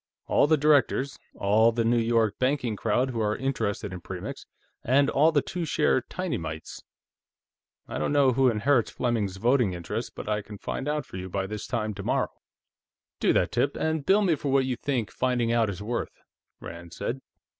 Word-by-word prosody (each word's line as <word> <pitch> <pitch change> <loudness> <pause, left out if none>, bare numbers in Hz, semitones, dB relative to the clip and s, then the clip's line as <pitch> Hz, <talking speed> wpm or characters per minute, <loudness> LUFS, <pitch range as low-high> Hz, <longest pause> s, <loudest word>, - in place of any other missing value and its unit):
All - - +3
the 155 +1 +4
directors. 140 -2 +2 0.2
All 110 +3 +4
the 115 0 0
New 120 +1 +3
York 115 -2 +1
banking 130 -4 0
crowd 130 +5 0
who 115 - -3
are 105 -1 0
interested 105 -7 -2
in 90 - -7
Premix. - - -7 0.4
And 140 +3 +3
all 155 +4 +4
the 145 -3 +2
two 180 -2 -4
share 150 -4 +2
tinymites. 85 - -5 1.1
I 65 - -4
don't 75 - 0
know 140 -2 +4
who 130 +1 +4
inherits 120 +2 +2
Fleming's 110 -6 -1
voting 120 -2 +2
interest, 85 -1 -5
but - - -7
I 105 0 0
can 105 0 -10
find 135 - -4
out 150 -2 -1
for - - -9
you 95 0 -6
by 95 +1 -2
this 105 +1 -6
time 110 -3 -2
tomorrow." - - -1 0.9
"Do - - +3
that, - - +2
Tip, - - +1
and 160 -2 -1
bill 200 +7 +4
me 180 -4 +3
for 145 -2 -2
what 135 -1 +3
you 130 -1 -1
think 120 -4 -2
finding 125 -2 0
out 115 -2 +2
is 100 0 -5
worth," 120 +2 -3 0.4
Rand 85 0 -9
said. 130 +3 -3
120 Hz, 190 wpm, -27 LUFS, 105-140 Hz, 1.1 s, the